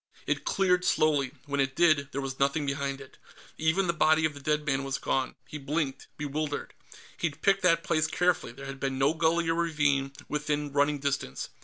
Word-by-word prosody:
It - - -1
cleared, 180 -2 +2
slowly; 145 -6 +2
when 140 -1 -2
it 135 -1 +1
did, 155 -5 +3
there 140 - -3
was 135 -1 -5
nothing 140 +2 +1
behind 140 -1 -2
it. 135 -1 -13 0.4
Even 160 +5 +2
the 170 - +1
body 155 -1 +3
of 155 - 0
the 140 - -10
dead 150 +1 0
man 135 -2 0
was 135 0 -2
gone. 130 -1 -1
He 150 - -7
blinked, 140 -1 -2
bewildered. 150 0 -3 0.4
He'd 160 -4 -3
picked 195 0 +4
that 165 -2 +3
place 155 -1 +1
carefully; 175 -4 +1
there 135 +3 -10
had 135 0 -7
been 135 -1 -2
no 135 +3 +3
gully 165 +1 +1
or 165 - +2
ravine 150 -5 +1 0.2
within 150 -1 -2
running 145 +1 +2
distance. 140 - -3
150 Hz, 195 wpm, -28 LUFS, 140-160 Hz, 0.4 s, picked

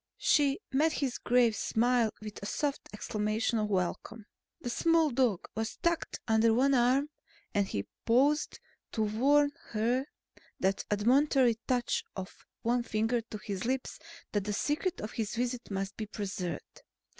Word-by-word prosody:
She 285 +1 +3
met 305 +4 +3
his 270 -5 -2
grave 240 -2 +3
smile 235 0 +2
with 210 -1 -7
a 200 - -4
soft 285 +3 -2
exclamation 215 +2 -1
of 210 -1 -1
welcome. 200 +3 -2 0.3
The 240 - -4
small 330 +1 +3
dog 240 -7 +1
was 225 +1 -3
tucked 340 -2 -1
under 220 0 +4
one 275 +3 +4
arm 260 +4 +3 0.4
and 200 -1 +2
he 100 - -3 0.2
paused 275 +6 +2 0.3
to 220 - +1
warn 280 +7 +3 0.2
her 230 +3 +1 0.3
with - - -26
that 190 +1 0
admonitory 245 +2 +3
touch 245 -2 +1
of 190 -1 -8 0.2
one 240 +1 +2
finger 225 +1 0
to 220 -1 -8
his 200 -2 -5
lips 260 +2 -2 0.3
that 205 -2 -1
the 210 - -1
secret 300 - -1
of 210 - -5
his 220 0 -3
visits 245 +1 -2
must 195 -1 -3
be 215 - -4
preserved. 195 -4 -5
235 Hz, 155 wpm, -31 LUFS, 210-265 Hz, 0.4 s, under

